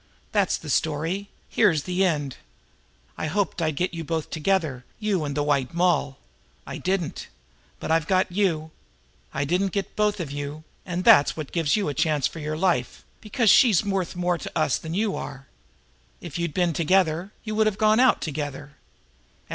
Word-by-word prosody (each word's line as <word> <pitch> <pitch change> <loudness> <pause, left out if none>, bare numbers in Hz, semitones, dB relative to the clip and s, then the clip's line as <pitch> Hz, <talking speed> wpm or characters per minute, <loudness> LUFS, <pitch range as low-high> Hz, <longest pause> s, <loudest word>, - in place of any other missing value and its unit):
"That's - - +2
the - - -6
story; 165 +6 -1 0.2
here's 165 -10 +3
the 180 +1 0
end. 145 -7 0 0.8
I - - -1
hoped 195 +1 -1
I'd 155 -2 0
get 180 +5 -1
you 165 -1 -4
both 160 0 -3
together, 155 -6 0 0.2
you 205 -6 0
and 145 -1 -3
the 145 - +1
White 145 +1 0
Moll. 170 -6 +1 0.5
I - - -6
didn't. 185 -4 -2 0.5
But - - -4
I've 165 -1 +2
got 185 -1 +2
you. 170 -5 0 0.6
I 140 +1 -1
didn't 180 +5 0
get 200 -2 0
you - - -29
both 210 -1 +1
and 155 +4 -5
that's 145 -3 +6
what 155 -3 -6
gives 165 -4 +1
you 210 -5 0
a 145 - -1
chance 150 0 +1
for 165 - -3
your 155 0 -3
life, 185 +1 0 0.2
because 215 0 +2
she's 220 -7 +5
worth 195 -3 -1
more 175 -1 0
to - - -7
us 155 -4 +2
than 160 +1 -5
you 210 0 0
are. 135 -1 -7 0.7
If 170 -2 -7
you'd 170 -3 -2
been 175 -2 +2
together, 175 +2 +1
you 215 - -4
would 215 0 +3
have 210 -2 -1
gone 215 +1 +4
out 255 0 +4
together. 145 -1 -5
170 Hz, 180 wpm, -25 LUFS, 150-195 Hz, 0.8 s, that's